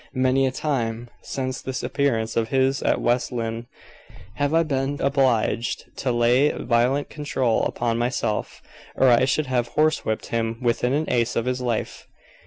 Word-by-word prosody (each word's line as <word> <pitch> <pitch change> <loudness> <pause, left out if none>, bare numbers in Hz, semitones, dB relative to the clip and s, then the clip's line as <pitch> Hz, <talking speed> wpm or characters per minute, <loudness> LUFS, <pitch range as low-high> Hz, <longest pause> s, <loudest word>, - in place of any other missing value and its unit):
Many 130 +1 +2
a - - -1
time, 120 -5 -2
since 130 -1 -4
this 130 -1 -4
appearance 115 -6 0
of 115 -1 +1
his 135 +2 +1
at - - +1
West 120 +2 0
Lynne, 115 -1 -4 0.7
have 145 0 0
I 165 +1 +4
been 140 -1 -2
obliged 130 -4 0
to 130 - -1
lay 120 +4 +3
violent 125 +4 0
control 130 -6 0
upon 115 -1 -1
myself, 120 -3 -2 0.3
or 130 - +4
I 120 +1 +5
should 145 +3 +1
have 120 -2 -1
horsewhipped 150 -8 +1
him 115 0 -1
within 125 +1 0
an 155 +2 +1
ace 120 -1 0
of 115 - 0
his 125 0 -1
life." 120 -3 -3
125 Hz, 160 wpm, -23 LUFS, 115-135 Hz, 0.7 s, I